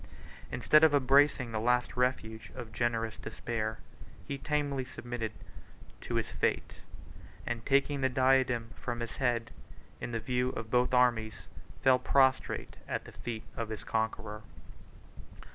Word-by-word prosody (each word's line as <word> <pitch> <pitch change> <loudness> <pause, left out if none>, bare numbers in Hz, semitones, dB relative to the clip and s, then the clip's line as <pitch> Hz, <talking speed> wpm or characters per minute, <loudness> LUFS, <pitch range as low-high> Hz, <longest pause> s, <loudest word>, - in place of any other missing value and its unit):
Instead 155 +1 +4
of 155 -2 +6
embracing 135 -2 +4
the 110 - -1
last 125 +2 +1
refuge 110 -4 -1
of 120 -4 -7
generous 115 -2 -1
despair, 110 -2 -3 0.5
he 140 - -2
tamely 140 -1 -1
submitted 120 -3 -5 0.7
to - - -4
his - - +1
fate; - - -1 0.6
and 115 -1 -4
taking 140 +1 +2
the 130 - +3
diadem 130 -3 +2
from 120 -1 -4
his 115 -1 -5
head, 120 -3 0 0.5
in 120 - -5
the 115 - -1
view 125 +2 0
of 110 0 -6
both 125 0 +3
armies 120 -3 +2 0.4
fell 130 -1 +6
prostrate 130 0 +2
at - - -3
the - - -10
feet 115 -2 -6
of 115 -1 -3
his 110 -2 -5
conqueror. 110 -1 -2
120 Hz, 140 wpm, -31 LUFS, 115-130 Hz, 0.7 s, of